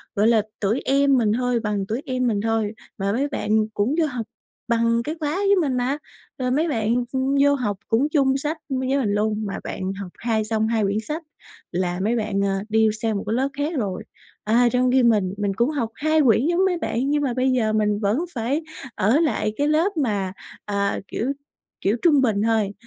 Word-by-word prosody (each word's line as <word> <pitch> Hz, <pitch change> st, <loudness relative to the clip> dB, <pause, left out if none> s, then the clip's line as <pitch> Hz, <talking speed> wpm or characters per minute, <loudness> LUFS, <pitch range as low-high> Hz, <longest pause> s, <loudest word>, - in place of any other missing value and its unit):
gọi 210 Hz, +2 st, +3 dB
là, 230 Hz, -2 st, +4 dB, 0.2 s
tuổi 215 Hz, +4 st, 0 dB
em 275 Hz, 0 st, +3 dB
mình 215 Hz, -3 st, +2 dB
thôi, 250 Hz, -1 st, +1 dB
bằng 210 Hz, -3 st, -2 dB
tuổi 230 Hz, +5 st, -2 dB
em 255 Hz, -1 st, 0 dB
mình 205 Hz, -3 st, 0 dB
thôi 225 Hz, -1 st, 0 dB, 0.2 s
mà 195 Hz, -1 st, -1 dB
mấy 265 Hz, +6 st, 0 dB
bạn 215 Hz, -6 st, 0 dB
cũng 225 Hz, +9 st, 0 dB
vô 320 Hz, -, +3 dB
học 250 Hz, -6 st, -4 dB, 0.4 s
bằng 230 Hz, 0 st, +2 dB
cái 305 Hz, +6 st, -4 dB
khóa 300 Hz, +1 st, -1 dB
với 400 Hz, +1 st, +3 dB
mình 270 Hz, -4 st, 0 dB
mà, 255 Hz, +3 st, 0 dB, 0.4 s
rồi 250 Hz, -1 st, -1 dB
mấy 310 Hz, +6 st, +2 dB
bạn, 225 Hz, -4 st, 0 dB, 0.2 s
ừm, 265 Hz, +1 st, 0 dB
vô 285 Hz, -, +5 dB
học 210 Hz, -7 st, -2 dB
cũng 250 Hz, +7 st, +2 dB
chung 275 Hz, -3 st, +2 dB
sách 300 Hz, +4 st, -2 dB
m 265 Hz, -1 st, -1 dB
với 260 Hz, +1 st, 0 dB
mình 225 Hz, -7 st, 0 dB
luôn, 215 Hz, +1 st, 0 dB
mà 200 Hz, -, -4 dB
bạn 190 Hz, +1 st, -4 dB
học 180 Hz, -3 st, -7 dB
hai 225 Hz, -2 st, 0 dB
xong 220 Hz, 0 st, 0 dB
2 225 Hz, -2 st, +1 dB
quyển 200 Hz, +1 st, 0 dB
sách 315 Hz, +2 st, -4 dB, 0.5 s
là 180 Hz, 0 st, -1 dB
mấy 225 Hz, +4 st, +1 dB
bạn, 210 Hz, -3 st, -1 dB
ờ, 195 Hz, -1 st, +1 dB
đi 220 Hz, 0 st, +4 dB
sang 220 Hz, -3 st, 0 dB
một -, -, -4 dB
cái 215 Hz, -, 0 dB
lớp 260 Hz, +3 st, +1 dB
khác 290 Hz, +4 st, -2 dB
rồi. 200 Hz, -6 st, -2 dB, 0.4 s
À, 235 Hz, +3 st, +3 dB
trong 250 Hz, +1 st, +2 dB
khi 260 Hz, -1 st, +4 dB
mình, 210 Hz, -6 st, +3 dB
mình 205 Hz, -1 st, -1 dB
cũng 235 Hz, +6 st, +1 dB
học 275 Hz, -7 st, -2 dB
2 310 Hz, +3 st, +2 dB
quyển 245 Hz, 0 st, +4 dB
giống 350 Hz, +3 st, +2 dB
mấy 365 Hz, -2 st, +1 dB
bạn 265 Hz, -4 st, -1 dB
nhưng 295 Hz, 0 st, +1 dB
mà 255 Hz, -, 0 dB
bây 260 Hz, +1 st, +1 dB
giờ 220 Hz, -4 st, +1 dB
mình 210 Hz, -1 st, +1 dB
vẫn 210 Hz, +3 st, +1 dB, 0.2 s
phải 255 Hz, +6 st, -1 dB, 0.3 s
ở 225 Hz, +10 st, +3 dB
lại 300 Hz, -9 st, 0 dB
cái 290 Hz, +1 st, +1 dB
lớp 325 Hz, +5 st, +1 dB
mà, 205 Hz, -9 st, 0 dB, 0.3 s
ờ, 200 Hz, -1 st, -1 dB
kiểu 255 Hz, +5 st, -2 dB, 0.5 s
kiểu, 205 Hz, +4 st, +1 dB
trung 300 Hz, -5 st, +5 dB
bình 215 Hz, -6 st, +1 dB
thôi. 220 Hz, -3 st, +1 dB
235 Hz, 225 wpm, -23 LUFS, 210-275 Hz, 0.5 s, vô